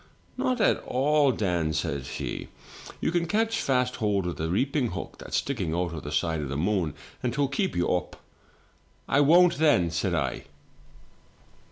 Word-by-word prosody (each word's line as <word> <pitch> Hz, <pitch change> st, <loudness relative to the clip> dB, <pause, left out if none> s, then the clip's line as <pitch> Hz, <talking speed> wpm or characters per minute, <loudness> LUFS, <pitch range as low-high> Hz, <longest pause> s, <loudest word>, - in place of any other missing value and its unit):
' -, -, -35 dB
" -, -, -32 dB
'Not 255 Hz, -1 st, 0 dB
at -, -, +3 dB
all, 145 Hz, +2 st, +2 dB
Dan,' 90 Hz, -8 st, 0 dB
says 70 Hz, -4 st, -2 dB
he; -, -, -5 dB, 0.5 s
'you -, -, 0 dB
can 170 Hz, -1 st, 0 dB
catch 225 Hz, +4 st, +1 dB
fast 125 Hz, -1 st, +1 dB
hold 100 Hz, -4 st, 0 dB
of 90 Hz, -, -3 dB
the 80 Hz, +1 st, -2 dB
reaping 130 Hz, -, +1 dB
hook 85 Hz, -, -6 dB
that's -, -, -3 dB
sticking 95 Hz, -, -2 dB
out 85 Hz, -1 st, -1 dB
of 80 Hz, -, -5 dB
the 75 Hz, -, -7 dB
side 80 Hz, +1 st, 0 dB
of 70 Hz, -, -4 dB
the 70 Hz, -, -3 dB
moon, 90 Hz, -2 st, 0 dB, 0.3 s
and 125 Hz, -, 0 dB
'twill 140 Hz, +1 st, +1 dB
keep 185 Hz, +7 st, -1 dB
you 85 Hz, -, +1 dB
up.' 90 Hz, 0 st, -2 dB, 0.9 s
"'I 140 Hz, -, +3 dB
won't 170 Hz, +4 st, +5 dB
then,' 145 Hz, -, +4 dB
said 85 Hz, -, 0 dB
I. -, -, -2 dB
105 Hz, 185 wpm, -27 LUFS, -, 0.9 s, won't